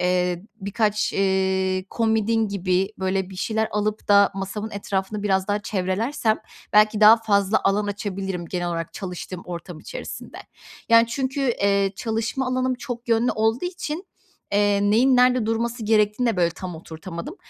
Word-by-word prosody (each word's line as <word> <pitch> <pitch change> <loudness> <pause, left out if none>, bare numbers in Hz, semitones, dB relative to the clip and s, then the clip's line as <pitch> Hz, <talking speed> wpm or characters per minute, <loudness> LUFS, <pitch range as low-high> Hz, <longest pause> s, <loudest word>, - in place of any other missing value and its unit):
eee, 180 -1 +1 0.2
birkaç, 210 +1 0
eee, 190 -1 +1
komodin 225 -1 +1
gibi 190 0 0
böyle 190 0 -1
bir 190 - -10
şeyler 220 +3 -1
alıp 210 +1 -2
da 200 0 +6
masamın 200 +3 -4
etrafını 200 0 -3
biraz 190 -1 +1
daha 205 - +1
çevrelersem 215 +5 -1 0.3
belki 215 0 +4
daha 215 +1 +9
fazla 205 -2 +2
alan 205 +1 +2
açabilirim 195 -3 -4
genel 175 +1 -3
olarak 165 -1 -4
çalıştığım 180 -1 -6
ortam 175 -1 -7
içerisinde. - - -8 0.5
Yani, 230 0 +6
çünkü, 265 +4 -2 0.2
eee, 200 -1 +2
çalışma 225 +4 -2
alanım 255 0 0
çok 245 -1 -7
yönlü 230 +1 +3
olduğu 220 +6 +1
için, 355 0 -4 0.5
eee, 205 0 +3
neyin 250 +5 +4
nerede 250 -2 +4
durması 230 +1 -1
gerektiğini 210 +2 +2
de 225 - 0
böyle 170 -1 +2
tam 180 0 -7
oturtamadım. 170 - -8
205 Hz, 150 wpm, -23 LUFS, 190-225 Hz, 0.5 s, daha